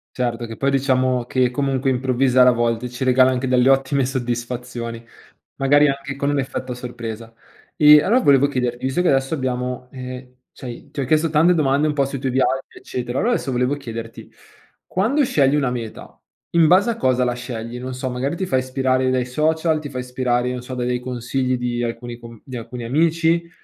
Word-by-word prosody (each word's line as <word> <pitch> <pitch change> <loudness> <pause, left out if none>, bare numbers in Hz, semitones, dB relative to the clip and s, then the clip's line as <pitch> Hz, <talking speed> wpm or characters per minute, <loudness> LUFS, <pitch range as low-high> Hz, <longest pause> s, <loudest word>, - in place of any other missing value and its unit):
Certo, 120 -2 -2
che 115 -1 -8
poi 140 - +1
diciamo 130 -2 +1
che 125 0 +1
comunque 135 +1 -1
improvvisare 130 0 +3
a - - +7
volte 120 0 0
ci 125 +2 -6
regala 130 0 +4
anche 130 +1 -2
delle 125 0 +3
ottime 135 0 +3
soddisfazioni, 120 -2 -4 0.5
magari 145 +2 +4
anche 140 0 -3
con 140 +1 -1
un 145 -1 +1
effetto 130 -2 -5
sorpresa. 115 -2 -7 0.4
E 150 -2 +8
allora 230 +9 +3
volevo 140 0 +5
chiederti 125 -1 -2
visto 135 +7 0
che 180 - +2
adesso 135 +3 +1
abbiamo, 125 -2 -3
ehm, 130 -1 -8 0.2
cioè 120 -2 -10
ti - - -13
ho 135 - 0
chiesto 155 +4 +2
tante 160 +4 +4
domande 145 -1 +2
un 150 - +1
po' 140 -1 +2
sui 135 0 -5
tuoi 130 -1 -2
viaggi, 135 +1 0
eccetera, 125 0 -4
allora 240 +3 +2
adesso 135 - -2
volevo 125 +3 0
chiederti: 115 -4 -8 0.6
quando 250 +10 +1
scegli 140 - +2
una 140 -4 +1
meta 115 -3 -7 0.4
in 165 -1 +6
base 185 +7 +4
a 230 - -2
cosa 130 -1 +1
la 125 -1 +1
scegli? 120 -1 -6
Non 130 +1 -6
so 130 0 -4
magari 130 +5 -2
ti 190 +2 -3
fai 130 - +1
ispirare 130 0 0
dai 130 -1 +1
social, 160 +4 +1
ti 150 -1 -7
fai 130 -1 -4
ispirare, 125 -1 -1
non 125 -1 -4
so, 130 +1 -7
da 125 - -3
dei 125 0 0
consigli 125 +1 -2
di 120 -1 -2
alcuni 120 0 -5
com 115 -2 -12
di 130 - -8
alcuni 120 +1 -7
amici, 165 +6 +1
130 Hz, 200 wpm, -21 LUFS, 125-140 Hz, 0.6 s, E